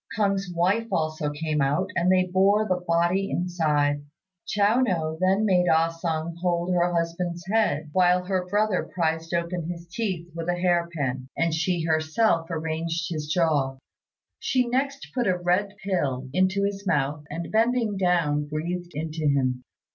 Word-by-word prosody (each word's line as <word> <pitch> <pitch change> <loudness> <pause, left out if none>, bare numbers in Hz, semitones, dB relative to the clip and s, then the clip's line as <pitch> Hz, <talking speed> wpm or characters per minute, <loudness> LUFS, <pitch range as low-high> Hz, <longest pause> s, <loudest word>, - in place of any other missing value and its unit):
K'ung's 195 -3 0
wife 185 +7 +1
also 155 -1 -1
came 150 0 -2
out, 150 +8 +1
and 175 +2 +3
they 185 0 +4
bore 195 +4 +3
the 180 -2 -1
body 175 +4 +2
inside. 150 -5 0 0.4
Chiao 210 +3 +3
no 165 -10 0
then 190 +3 +3
made 180 -3 +3
Ah 160 +1 +4
sung 165 0 -3
hold 175 0 0
her 175 0 +2
husband's 170 +1 -2
head, 190 -8 0
while 180 0 +4
her 185 -1 -1
brother 205 -1 +1
prised 165 -2 -2
open 170 -1 -2
his 170 -1 -6
teeth 180 -3 -3
with 165 +1 -4
a 175 - +2
hair 175 -1 +1
pin, 130 -5 -3
and 165 -1 +1
she 165 +1 0
herself 165 +3 +1
arranged 165 +1 -2
his 155 -2 -3
jaw. 150 -5 +1 0.6
She 255 -2 +1
next 275 +3 -2
put 245 -4 0
a 185 -1 +2
red 180 +3 0
pill 140 -10 -1
into 190 +3 +2
his 200 0 -2
mouth, 150 -2 0
and 165 +2 -5
bending 225 -1 +2
down 170 -6 +1
breathed 175 +4 -4
into 155 0 -2
him. 130 -3 +1
175 Hz, 160 wpm, -25 LUFS, 160-190 Hz, 0.6 s, they